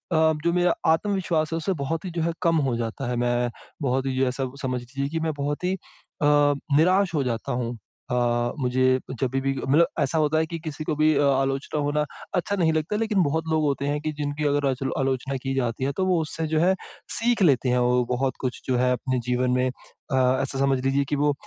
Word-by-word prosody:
जो 160 +1 +2
मेरा 180 -1 +3 0.2
आत्मविश्वास 170 -3 0
है - - 0
उससे 175 +4 -1
बहुत 165 +5 -3
ही 180 - -4
जो 170 -1 -2
है 170 - 0
कम 165 -2 +3
हो 125 - 0
जाता 115 +3 -3
है। 125 - -1
मैं 120 0 +1 0.3
बहुत 130 -1 0
ही 130 -1 -2
जो 130 0 +2
ऐसा 130 0 -2
समझ 125 -2 -2
लीजिए 135 +3 -4
कि 165 +2 -2
मैं 160 -1 -1
बहुत 145 +3 -2
ही 180 +1 +1
अ, 175 -4 -7 0.5
निराश 185 +3 +3
हो 145 - +2
जाता 115 -3 -3
हूँ। 120 -1 -3 0.3
अ, - - +1 0.4
मुझे 130 0 +2 0.2
जभी 130 0 0
भी 135 0 0
मतलब 155 +5 +5
ऐसा 145 +2 +1
होता 155 +1 +2
है 160 - +2
कि 165 - -5
किसी 155 -1 -6
को 155 - -1
भी 155 0 +4
अ, 145 - +3
आलोचना 135 +2 0
होना 145 +1 +1 0.3
अच्छा 180 +3 0
नहीं 165 -3 +2
लगता 155 +6 -1
है - - -1
लेकिन 215 -4 +2
बहुत 160 +2 -1
लोग 155 -1 +2
होते 140 -1 0
हैं 145 +1 -1
कि 155 0 -2
जिनकी 145 +1 -2
अगर 145 0 +1
अचलो 135 +1 -2
आलोचना 135 0 -1
की 135 - -1
जाती 125 -1 -1
है 140 - 0
तो 190 - +1
वो 180 -2 +3
उससे 160 +1 -3
जो 155 0 +1
है 185 +2 +4 0.4
सीख 235 0 +1
लेते 135 -5 +3
हैं 125 - +2
वो 125 0 +3
बहुत 130 +1 0
कुछ 130 -2 -3
जो 130 -2 +1
है 125 +1 +2
अपने 130 +1 -1
जीवन 125 0 +1
में। 125 0 +2
अ, 130 +1 -7 0.2
ऐसा 135 0 -2
समझ 135 -1 +2
लीजिए 140 +1 +2
कि 145 - +1
वो 145 0 +3
140 Hz, 230 wpm, -25 LUFS, 130-160 Hz, 0.5 s, मतलब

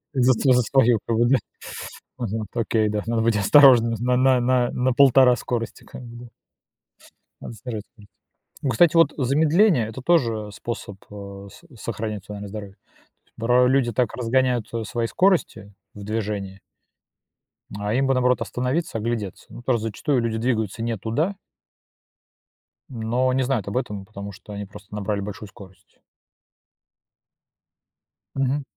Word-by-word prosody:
Св 130 0 +4
за 125 - +4
свою, 120 -3 +3
как 115 -1 0
бы, 120 - +3
да. 135 - +4 0.8
Мгм, 110 -2 -3
окей, 110 -2 +1
да. 105 0 -1
Надо 115 -1 0
быть 115 -1 +2
осторожными 115 +1 +6
на 125 +1 +3
на 125 0 +1
на 130 +1 0
1,5 130 -1 +6
скорости, 115 -1 -4
как 125 - -11
бы, 120 0 -10
да. - - -14 1.1
Надо - - -8
снижать 110 -1 -6
скорость. 105 -5 -18 0.5
Ну, 135 - 0
кстати, 170 +8 +4
вот 165 -3 +5
замедление- 150 - +3
это 120 +3 -8
тоже, 115 -10 +1
э, - - -10
способ, 110 -2 -6
э, 100 -1 -9
со 170 - -17
сохранять 110 -2 -4
эмоциональное 105 0 -8
здоровье. 100 -1 -8
То - - -44 0.5
есть, - - -36
бра 125 +2 +3
люди 130 -2 +2
так 120 -1 0
разгоняют, 125 -1 +1
а, 115 -1 -2
свои 115 +2 -2
скорости 170 - +1 0.2
в 105 - -10
движении 100 -2 -4 1.2
а 105 +1 -2
им 135 +3 +2
бы, 135 - +3
наоборот, 125 0 +2
остановиться, 130 +2 -2
оглядеться, 110 -4 -4
ну. - - -10
Тоже 120 -2 +1
зачастую 115 +5 -1
люди 115 -1 -1
двигаются 115 -2 -1
не 115 -2 -2
туда 150 - -1 1.5
но 120 +2 0
не 130 - +1
знают 125 -7 -1
об 125 - -3
этом, 105 -7 -4
потому 100 -1 -8
что 105 - -13
они 100 0 -5
просто 100 +1 -14
набрали 105 0 -2
большую 105 +1 -7
скорость. 95 -3 -17 2.4
Мгм. 135 +1 0
115 Hz, 150 wpm, -23 LUFS, 105-130 Hz, 2.4 s, осторожными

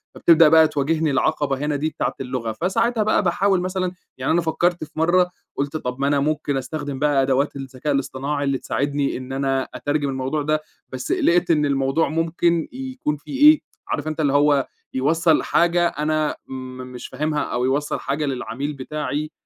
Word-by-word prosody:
فبتبدأ 165 -2 +6
بقى 160 0 +7
تواجهني 155 +2 0
العقَبة 140 0 +1
هنا 150 -1 0
دي، 150 +3 -1
بتاعة - - -2
اللغة 125 -3 -3
فساعتها 225 +5 +1
بقى 215 - +2
باحاول 190 +1 +2
مثلًا 185 0 -2 0.3
يعني 130 +3 -1
أنا 170 +1 +3
فكَّرت 175 +1 0
في - - -10
مرّه، 175 +3 +3 0.3
قُلت 140 +2 -2
طب 125 -3 -5
ما 140 - +1
أنا 145 0 +2
ممكن 145 -1 0
أستخدِم 135 +1 -4
بقى 145 -2 +3
أدوات 135 +2 +1
الذكاء 135 +2 -3
الاصطناعي 140 +1 -2
اللي 140 -1 +1
تساعدني 140 0 -1
إن 130 +1 -8
أنا 135 -1 0
أترجم 145 -1 -1
الموضوع 135 +3 -2
ده، 155 +1 0 0.3
بس 130 -1 -5
قِلِقت 175 0 +3
إن 150 -2 +3
الموضوع 135 +2 +1
ممكن 165 +1 +1
يكون 260 - -3
فيه 270 - -7
إيه، 310 - +1 0.3
عارف - - -2
أنت 155 +1 -4
اللي 140 -2 +2
هو 145 -1 +3 0.3
يوصَّل 160 +4 +2
حاجة 175 0 +3
أنا 155 0 -1
م - - -8 0.4
مش 125 - -7
فاهمها، 150 0 -1
أو 125 +1 -1
يوصَّل 145 +3 0
حاجة 140 +2 -2
للعميل 135 +1 -3
بتاعي 150 +2 -4
150 Hz, 175 wpm, -22 LUFS, 135-165 Hz, 0.4 s, بقى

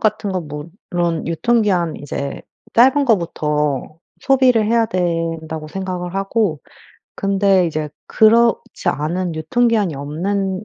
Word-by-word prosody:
같은 215 -2 0
거 185 - -1
물론 165 +2 -4
유통기한 180 -2 +1
이제 140 -1 -5 0.3
짧은 265 +4 +5
거부터 150 - 0 0.2
소비를 255 -4 +3
해야 230 0 +3
된다고 165 -4 -2
생각을 180 0 -5
하고 195 -5 0 0.5
근데 195 -2 +2
이제 155 -1 -3 0.2
그렇지 230 0 +3
않은 170 +3 -1
유통기한이 210 +2 +1
없는 190 +7 -2
185 Hz, 255 characters per minute, -19 LUFS, 160-215 Hz, 0.5 s, 짧은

